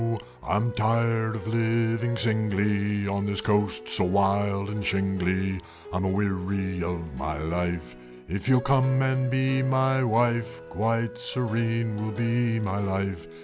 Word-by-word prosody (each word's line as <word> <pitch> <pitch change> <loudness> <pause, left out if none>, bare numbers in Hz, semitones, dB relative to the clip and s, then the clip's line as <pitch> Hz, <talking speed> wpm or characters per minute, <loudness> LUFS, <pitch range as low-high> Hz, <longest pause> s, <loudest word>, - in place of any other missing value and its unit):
"I 95 - -1
am 115 +3 +1
tired 115 0 +1
of 110 -2 -6
living 115 +1 +1
singly 105 -2 +1
On 100 +1 -1
this 100 0 +1
coast 105 - +1
so - - +3
wild 100 +1 +1
and 105 -1 -3
shingly, 95 -1 0 0.3
I'm 90 +1 0
a - - +1
weary 95 -1 -1
of 85 -3 -4
my 75 +3 -3
life; 85 -4 -3 0.3
If 95 +8 -3
you'll 130 -1 +5
come 135 0 +3
and 130 0 +1
be 130 0 +1
my 130 0 +2
wife, 120 -3 +1
Quite 115 +3 -1
serene 115 -3 -1
would 110 0 -4
be 115 -1 +1
my 100 -2 -2
life!" 95 -3 -2
105 Hz, 145 wpm, -26 LUFS, 95-115 Hz, 0.3 s, you'll